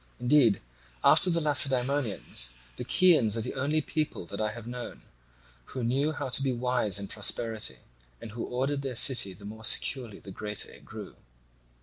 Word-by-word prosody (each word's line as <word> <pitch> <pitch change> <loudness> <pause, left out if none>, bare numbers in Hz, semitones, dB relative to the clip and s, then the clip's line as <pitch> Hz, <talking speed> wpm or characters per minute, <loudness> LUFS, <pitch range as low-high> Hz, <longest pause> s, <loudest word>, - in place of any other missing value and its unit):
Indeed, 125 -4 +3 0.4
after 185 - +6
the 170 -1 +2
Lacedaemonians, 135 - +2 0.2
the - - -6
Chians 145 - +3
are - - -2
the - - -5
only 145 +4 -1
people 155 - -4
that 100 +5 -6
I 105 0 -1
have 115 0 -10
known 120 0 -8 0.6
who 130 - -6
knew 135 +6 0
how 145 -2 -5
to 130 - +2
be 135 -1 0
wise 125 -4 0
in 100 -1 -4
prosperity, 110 - -2 0.4
and 110 - -10
who 115 +2 -6
ordered 135 +3 -2
their 135 -3 -5
city 115 -5 +4
the 100 +3 -14
more 110 +2 -10
securely 120 -1 +1
the 95 - -12
greater 105 +1 -4
it - - -16
grew. - - -10
125 Hz, 175 wpm, -28 LUFS, 110-140 Hz, 0.6 s, after